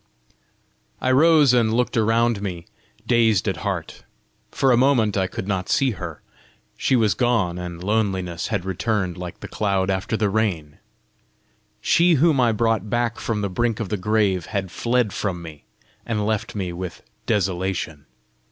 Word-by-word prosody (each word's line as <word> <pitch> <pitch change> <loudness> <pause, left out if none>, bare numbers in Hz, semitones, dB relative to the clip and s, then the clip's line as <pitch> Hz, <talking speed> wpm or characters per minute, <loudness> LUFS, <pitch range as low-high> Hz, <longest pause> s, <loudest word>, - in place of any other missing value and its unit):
I 130 - +1
rose, 150 -1 +5
and 115 -3 +3
looked 125 +1 0
around 115 -1 +2
me, 90 -4 -5 0.4
dazed 115 -5 +3
at 95 -3 -1
heart. 95 -2 -4 0.5
For 135 - +2
a - - +6
moment 120 -5 +3
I 95 -2 +1
could 95 - -6
not 95 -3 -2
see 135 -2 +2
her: 85 -7 -7 0.5
she 130 - +1
was 110 -4 +3
gone, 110 -8 0
and 90 -1 -7
loneliness 95 -4 -1
had 100 -5 -2
returned 95 -1 -1
like 90 -1 -8
the - - -6
cloud 95 -2 0
after 95 +3 -1
the 105 0 +1
rain! 90 -9 -1 1.0
She 170 0 +4
whom 155 -1 +3
I 120 -2 +4
brought 110 -2 0
back 120 +1 -1
from 110 -3 -2
the 100 - 0
brink 115 +3 0
of 110 -5 -3
the 105 - 0
grave, 100 -3 0
had 95 -4 -3
fled 120 -3 0
from 95 -4 -2
me, 75 -3 -11 0.4
and 105 -3 -2
left 110 -1 -2
me 95 -4 -3
with 90 0 -7 0.2
desolation! 95 -6 -1
105 Hz, 160 wpm, -22 LUFS, 95-115 Hz, 1.0 s, a